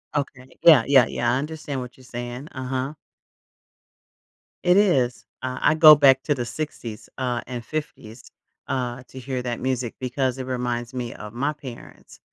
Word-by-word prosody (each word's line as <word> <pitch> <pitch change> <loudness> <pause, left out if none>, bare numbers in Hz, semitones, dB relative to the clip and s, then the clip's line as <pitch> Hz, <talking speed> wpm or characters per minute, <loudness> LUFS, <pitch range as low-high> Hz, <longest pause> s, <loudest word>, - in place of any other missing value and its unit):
Okay 135 -2 -3 0.2
yeah, 155 -8 +8
yeah, 135 -3 +6
yeah, 120 0 0
I 130 - +2
understand 150 -2 -5
what 125 0 -9
you're 130 - -17
saying, 120 +3 -7
uh-huh. 130 +1 -3 1.7
It 180 +1 +5
is, 135 -12 +2 0.2
uh, 130 0 -4
I - - +4
go 155 -1 +10
back 135 -2 +5
to 150 - +1
the 120 - -3
60s, 120 -6 -6
uh, 125 -2 -1
and 125 -2 -5
50s, 135 -6 -7 0.4
uh, 125 -1 -2
to 130 - -9
hear 130 0 -4
that 120 -1 -3
music 130 -2 -2
because 130 0 -1
it 130 - -5
reminds 120 -2 -3
me 125 -2 -4
of 105 0 -9
my 135 +5 0
parents, 140 -5 -12
130 Hz, 165 wpm, -24 LUFS, 120-140 Hz, 1.7 s, go